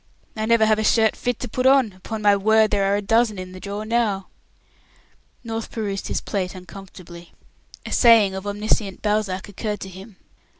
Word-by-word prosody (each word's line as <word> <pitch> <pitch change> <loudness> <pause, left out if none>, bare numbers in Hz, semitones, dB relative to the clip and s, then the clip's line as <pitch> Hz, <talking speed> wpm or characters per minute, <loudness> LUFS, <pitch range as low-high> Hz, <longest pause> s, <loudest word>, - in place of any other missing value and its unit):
"I 215 0 -2
never 230 -1 +4
have 215 0 +2
a - - 0
shirt 220 0 +3
fit 245 -2 -3
to - - -3
put 255 +4 0
on. 265 -6 +4
Upon 210 +4 -7
my 205 -1 +5
word, 220 +2 +3
there 195 -1 +1
are - - +3
a 205 - -2
dozen 225 0 +2
in 185 0 -7
the 185 - -10
drawer 205 +2 -6
now." 215 -4 -1 1.1
North 225 -1 -5
perused 200 -3 -4
his - - -2
plate 190 -2 -3
uncomfortably. 180 -2 -12 0.5
A - - -7
saying 225 -5 +5
of 190 +1 -6
omniscient 205 -1 -2
Balzac 210 -3 -1
occurred 210 0 -5
to 190 - -6
him. 190 +3 -12
210 Hz, 185 wpm, -22 LUFS, 195-220 Hz, 1.1 s, my